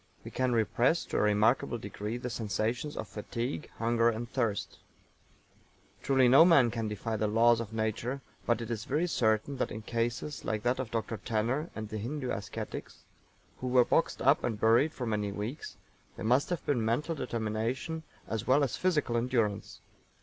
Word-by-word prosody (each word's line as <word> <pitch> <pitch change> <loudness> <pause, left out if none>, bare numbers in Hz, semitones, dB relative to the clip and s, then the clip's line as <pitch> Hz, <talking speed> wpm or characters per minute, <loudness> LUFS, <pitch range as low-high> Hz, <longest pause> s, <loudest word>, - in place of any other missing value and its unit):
We - - -8
can 130 -1 0
repress 120 +7 +2
to - - -3
a - - +3
remarkable 105 +4 +2
degree 105 +2 -5
the 125 0 -5
sensations 115 +6 -2
of 110 - -4
fatigue, 120 +8 -4
hunger 115 0 +3
and 115 +1 -3
thirst. 115 -5 -2 1.2
Truly 135 -2 +4
no 135 +6 +8
man 145 -9 +5
can 115 -1 -2
defy 110 +1 -3
the 105 +1 0
laws 115 +2 +4
of 115 -2 -5
nature, 110 +4 -2 0.3
but 120 -1 +2
it 115 - -5
is 110 -2 -3
very 150 +6 +1
certain 115 -3 +1
that - - -1
in 110 +1 -7
cases 120 +6 -2
like 110 -1 -2
that 125 +2 +1
of 130 -4 -3
Dr. 115 0 -3
TANNER, 120 - -1
and 110 -1 -5
the 110 - -4
Hindu 130 +4 -3
ascetics 100 - -6 0.6
who 130 - -4
were 125 -1 +5
boxed - - +1
up - - +4
and 110 -3 -2
buried 115 +8 +4
for 130 - -5
many 105 -2 -1
weeks, 110 +9 -6 0.4
there - - -6
must 125 +5 +3
have 175 -2 -3
been 125 -6 +1
mental 120 +9 0
determination 120 +4 -2 0.3
as 110 -2 -3
well 135 +3 +5
as 135 - -1
physical 155 -9 +1
endurance. 115 -4 -1
115 Hz, 180 wpm, -30 LUFS, 110-130 Hz, 1.2 s, no